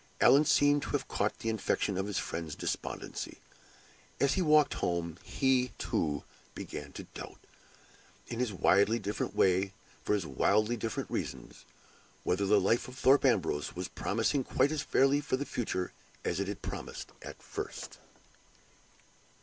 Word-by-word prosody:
Allan 145 Hz, +3 st, +6 dB
seemed 145 Hz, 0 st, +4 dB
to -, -, -5 dB
have -, -, 0 dB
caught -, -, -1 dB
the 115 Hz, -, -3 dB
infection 105 Hz, -2 st, 0 dB
of 95 Hz, +2 st, -1 dB
his 105 Hz, -, -2 dB
friend's 80 Hz, -3 st, -3 dB
despondency. -, -, -4 dB, 0.8 s
As 140 Hz, +1 st, +3 dB
he 190 Hz, -, +1 dB
walked 155 Hz, -3 st, +5 dB
home, 85 Hz, -1 st, -2 dB
he, 130 Hz, -2 st, +1 dB
too, 75 Hz, -2 st, -1 dB, 0.3 s
began -, -, -6 dB
to -, -, -7 dB
doubt -, -, -8 dB, 0.9 s
in 115 Hz, -, -5 dB
his 125 Hz, -3 st, 0 dB
widely 100 Hz, +3 st, +4 dB
different 105 Hz, -2 st, -3 dB
way, 95 Hz, 0 st, +4 dB
and 95 Hz, 0 st, -4 dB, 0.3 s
for 105 Hz, -, +2 dB
his 100 Hz, -4 st, -2 dB
widely 105 Hz, -, +2 dB
different 115 Hz, -1 st, -4 dB
reasons -, -, -5 dB, 0.6 s
whether 100 Hz, +2 st, +1 dB
the 105 Hz, +1 st, +5 dB
life 115 Hz, +6 st, +1 dB
at 125 Hz, -, -11 dB
Thorpe 135 Hz, +2 st, +5 dB
Ambrose 90 Hz, -, +1 dB
was -, -, -3 dB
promising 115 Hz, +6 st, 0 dB
quite 130 Hz, +3 st, +2 dB
as 155 Hz, -2 st, -1 dB
fairly 140 Hz, +2 st, +3 dB
for 145 Hz, -3 st, -1 dB
the 140 Hz, -, -3 dB
future 95 Hz, -9 st, -2 dB, 0.3 s
as 85 Hz, -, 0 dB
it 100 Hz, -, -1 dB
had 100 Hz, 0 st, -5 dB
promised -, -, -6 dB
at -, -, -9 dB
first. -, -, -6 dB
110 Hz, 160 wpm, -31 LUFS, 95-135 Hz, 0.9 s, Allan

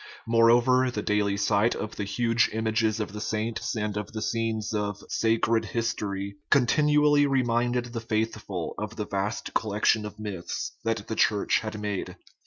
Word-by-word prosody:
Moreover, 120 Hz, +3 st, +4 dB
the 105 Hz, -4 st, -3 dB
daily 105 Hz, -1 st, +1 dB
sight 105 Hz, +3 st, +2 dB
of 110 Hz, -, -5 dB
the 105 Hz, -, -3 dB
huge 115 Hz, +3 st, +2 dB
images 110 Hz, 0 st, 0 dB
of 105 Hz, -1 st, -3 dB
the 105 Hz, -, -6 dB
saints 110 Hz, +2 st, -2 dB
and 105 Hz, -2 st, -2 dB
of 105 Hz, +1 st, -5 dB
the 110 Hz, -, -4 dB
scenes 110 Hz, -1 st, -1 dB
of 105 Hz, -1 st, -2 dB
" -, -, -34 dB
sacred 115 Hz, 0 st, +2 dB
history 100 Hz, -4 st, -3 dB
" -, -, -49 dB
con 140 Hz, -3 st, +5 dB
tinually 150 Hz, +1 st, +4 dB
reminded 120 Hz, -2 st, +1 dB
the 115 Hz, -, -3 dB
faithful 110 Hz, -5 st, -2 dB
of 105 Hz, +1 st, -5 dB
the 105 Hz, -, -3 dB
vast 100 Hz, +2 st, -3 dB
collection 105 Hz, 0 st, +2 dB
of -, -, -11 dB
myths 100 Hz, -5 st, -4 dB
that 115 Hz, -2 st, -2 dB
the 110 Hz, -, -3 dB
Church 105 Hz, -2 st, +2 dB
had 110 Hz, -1 st, -5 dB
made. 105 Hz, -2 st, -3 dB
110 Hz, 175 wpm, -27 LUFS, 105-115 Hz, -, con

